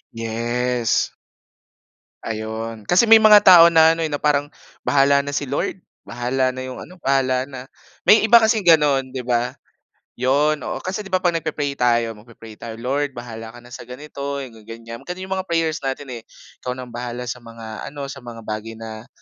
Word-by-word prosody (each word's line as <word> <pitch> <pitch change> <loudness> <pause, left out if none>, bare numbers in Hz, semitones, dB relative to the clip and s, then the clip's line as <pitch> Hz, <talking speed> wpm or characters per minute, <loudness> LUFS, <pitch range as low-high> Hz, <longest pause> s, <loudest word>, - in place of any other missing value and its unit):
Yes. 120 +1 -1 1.2
Ayun, 110 0 -5
kasi 180 +5 +5
may 225 0 +9
mga 210 -1 +7
tao 175 -3 +9
na 160 -1 +6
ano 165 0 -1
na 150 - -3
eh, - - -6
parang 145 -1 +2 0.4
bahala 140 0 +4
na 145 0 -4
si - - -1
Lord. 180 +5 -2 0.2
Bahala 130 +2 -1
na 130 - -6
yung 130 0 -7
ano, 180 - -11
bahala 130 -1 +1
na. 130 -2 -8 0.4
May 220 - +7
iba 235 +2 +7
kasi 220 -1 +2
gano'n 150 -6 +4
di 130 -2 -6
ba. 120 0 -1 0.6
Yun 145 +4 +2
oo. - - -4
Kasi 190 +3 -3
'di 205 - -7
ba 185 -1 0
'pag 175 - +3
nagpe-pray 155 -4 -2
tayo, 120 -2 +2
magpe-pray 110 0 -13
tayo, 115 -1 -7
"Lord 135 +4 -2
bahala 115 -1 -8
ka - - -11
na 120 - -16
sa 120 0 -10
ganito, 140 +1 -6
mga 115 -4 -13
ganyan." 115 0 -9
Gano'n 180 +1 -7
yung 190 - -13
mga 190 0 -4
prayers 165 -2 0
natin 135 0 -5
eh. 120 - -7 0.4
"Ikaw 125 0 -4
na 130 - -7
ang 120 - -14
bahala 120 0 -5
sa 125 0 -5
mga 115 -2 -9
ano, 145 0 -7
sa 140 - -9
mga 120 -3 -10
bagay 110 +1 -5
na 110 +1 -9
130 Hz, 195 wpm, -21 LUFS, 115-150 Hz, 1.2 s, may